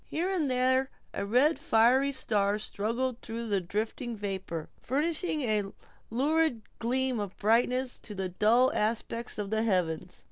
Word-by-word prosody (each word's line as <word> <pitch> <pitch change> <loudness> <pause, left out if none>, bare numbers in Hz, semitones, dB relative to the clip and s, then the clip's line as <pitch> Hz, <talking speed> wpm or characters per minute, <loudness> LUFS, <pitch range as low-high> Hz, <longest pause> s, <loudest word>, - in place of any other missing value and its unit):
Here 345 +4 -1
and 325 -7 +1
there, 260 +1 +2 0.2
a 200 - -3
red 250 +8 +5
and - - -7
fiery 250 +5 +4
star 205 -6 +1
struggled 230 +4 -2
through 230 0 -5
the 200 -2 +1
drifting 220 +5 -3
vapor, 190 -5 -4
furnishing 310 +4 0
a 210 -5 0 0.4
lurid 280 0 +1 0.2
gleam 255 +1 0
of 205 -2 -5
brightness 245 +4 +2
to 210 - -8
the 190 -1 -2
dull 230 +8 +4
aspect 230 +2 -1
of 205 -1 -4
the 220 0 +1
heavens. 180 -5 -1
230 Hz, 150 wpm, -29 LUFS, 205-260 Hz, 0.4 s, red